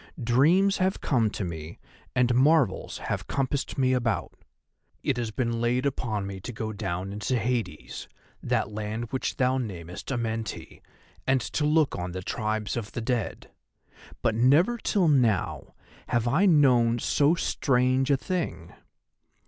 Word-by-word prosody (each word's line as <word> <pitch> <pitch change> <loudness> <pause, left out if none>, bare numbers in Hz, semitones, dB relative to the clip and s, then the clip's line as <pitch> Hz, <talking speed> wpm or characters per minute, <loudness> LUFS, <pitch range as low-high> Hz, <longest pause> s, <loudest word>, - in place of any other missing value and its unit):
Dreams 165 +12 +4
have 190 +1 0
come 115 -6 +1
to 105 - -4
me 80 -2 -6 0.4
and 125 -1 +3
marvels 135 -4 +2
have - - -4
compassed 135 0 -2
me 130 -1 +3
about. 120 -4 -1 0.7
It 135 - 0
has 120 -2 -2
been 115 0 -2
laid 125 +3 +1
upon 115 -7 -1
me 95 -1 -6
to 110 - -7
go 110 -2 -4
down 95 -1 -4
into 105 +5 -1
Hades, 115 -8 -3 0.3
that 105 - 0
land 110 +2 -4
which 130 - -2
thou 130 0 +2
namest 90 -5 -6
Amenti, 115 -3 -4 0.5
and 135 0 +4
to 150 +4 -2
look 150 -1 +3
on 90 0 -4
the 95 0 -5
tribes 110 0 -2
of 115 -3 -5
the 120 - -3
Dead; 115 -1 -3 0.7
but 115 - +2
never 145 - +4
till 195 -5 +1
now 120 - +1 0.3
have 120 0 0
I 160 +12 +3
known 125 -8 +4
so 145 +6 +2
strange 130 -4 +1
a 140 - +4
thing. 180 +4 -4
120 Hz, 150 wpm, -27 LUFS, 110-135 Hz, 0.7 s, Dreams